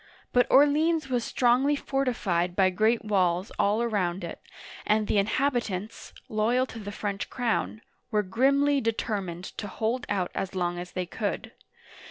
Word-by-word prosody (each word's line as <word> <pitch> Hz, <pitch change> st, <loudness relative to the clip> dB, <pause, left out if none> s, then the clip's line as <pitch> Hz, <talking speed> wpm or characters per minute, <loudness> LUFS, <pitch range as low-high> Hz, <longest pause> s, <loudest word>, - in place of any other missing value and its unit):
But 245 Hz, -1 st, +4 dB
Orleans 300 Hz, +2 st, +4 dB
was 245 Hz, -2 st, 0 dB
strongly 255 Hz, +5 st, +2 dB
fortified 220 Hz, -12 st, -1 dB
by 190 Hz, -1 st, +4 dB
great 220 Hz, +4 st, +1 dB
walls 185 Hz, -2 st, +1 dB
all 210 Hz, +3 st, +2 dB
around 190 Hz, -5 st, -1 dB
it, 170 Hz, -, -7 dB, 0.4 s
and 215 Hz, 0 st, +2 dB
the 205 Hz, -, +2 dB
inhabitants, 220 Hz, -2 st, -1 dB, 0.2 s
loyal 230 Hz, +4 st, +1 dB
to 225 Hz, -, -7 dB
the 205 Hz, -1 st, -6 dB
French 200 Hz, -1 st, -4 dB
crown, 230 Hz, -3 st, -1 dB, 0.3 s
were 210 Hz, -3 st, +1 dB
grimly 275 Hz, +7 st, +2 dB
determined 200 Hz, -6 st, -2 dB, 0.2 s
to 205 Hz, -, -4 dB
hold 225 Hz, +5 st, -2 dB
out 190 Hz, -3 st, -1 dB
as 195 Hz, 0 st, -4 dB
long 175 Hz, -1 st, -1 dB
as 180 Hz, 0 st, -8 dB
they 185 Hz, -1 st, -2 dB
could. 205 Hz, +3 st, -4 dB
215 Hz, 150 wpm, -27 LUFS, 190-250 Hz, 0.4 s, But